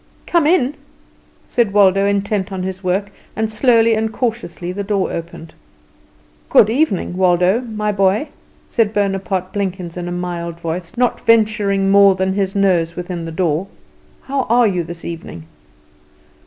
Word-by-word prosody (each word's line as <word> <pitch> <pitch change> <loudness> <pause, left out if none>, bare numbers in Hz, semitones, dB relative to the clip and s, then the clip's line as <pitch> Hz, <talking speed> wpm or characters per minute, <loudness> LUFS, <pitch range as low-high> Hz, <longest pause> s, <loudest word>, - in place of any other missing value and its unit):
"Come 335 -4 +2
in," 295 -5 +2 0.7
said 230 -5 0
Waldo, 195 -1 +4
intent 200 0 -1
on 185 -1 -4
his 190 +1 -5
work; 195 +3 -1 0.2
and 220 +1 -1
slowly 230 0 +3
and 220 0 -1
cautiously 220 -8 -3
the 200 +2 -4
door 200 -1 -1
opened. 165 -1 -7 1.0
"Good 220 -5 +5
evening, 235 - 0
Waldo, 180 +4 +3
my 215 -3 -3
boy," 195 +7 +1 0.4
said 220 -3 0
Bonaparte 195 -2 -1
Blenkins 185 -4 -4
in 175 0 -4
a - - -4
mild 175 -1 -4
voice, 170 +5 -5
not 245 0 +1
venturing 210 -3 +2
more 200 -1 +6
than 190 0 0
his 195 -1 -1
nose 175 -4 +1
within 175 -1 -5
the 165 - -6
door. 170 +1 -1 0.6
"How 270 -1 -2
are 240 +1 +4
you 185 -5 0
this 170 0 -9
evening?" 165 - -7
195 Hz, 150 wpm, -18 LUFS, 180-215 Hz, 1.0 s, more